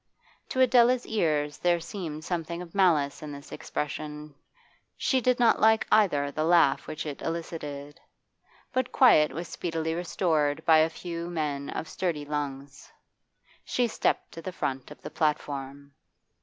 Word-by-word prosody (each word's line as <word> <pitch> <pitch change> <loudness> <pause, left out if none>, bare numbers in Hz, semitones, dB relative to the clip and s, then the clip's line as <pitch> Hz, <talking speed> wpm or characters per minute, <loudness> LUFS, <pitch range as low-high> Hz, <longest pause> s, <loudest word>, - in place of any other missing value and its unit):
To 260 - -3
Adela's 250 0 +5
ears 150 -8 0
there 175 -1 +2
seemed 165 -3 -6
something 170 -1 -3
of 175 -2 -9
malice 160 -8 +2
in 150 -1 -7
this 140 0 -10
expression; 150 0 -5 0.6
she 260 -2 +1
did 250 +1 +2
not 235 -2 +4
like, 220 0 +5
either, 145 -10 +3
the 155 - -2
laugh 165 -4 +3
which 155 +1 -5
it 145 -2 -6
elicited. 150 -3 -5 0.7
But 255 -1 0
quiet 155 - +5
was 165 +5 -5
speedily 160 -1 -3
restored 160 -3 0
by 160 -1 +6
a 160 +1 +4
few 170 +1 -6
men 150 -4 -3
of 160 - -4
sturdy 165 -6 -3
lungs. 140 -2 -5 0.7
She 245 -1 0
stepped - - -1
to 165 - -9
the 185 - -5
front 135 -6 -3
of 150 - -12
the - - -7
platform. 140 -2 -2
160 Hz, 150 wpm, -27 LUFS, 145-175 Hz, 0.7 s, by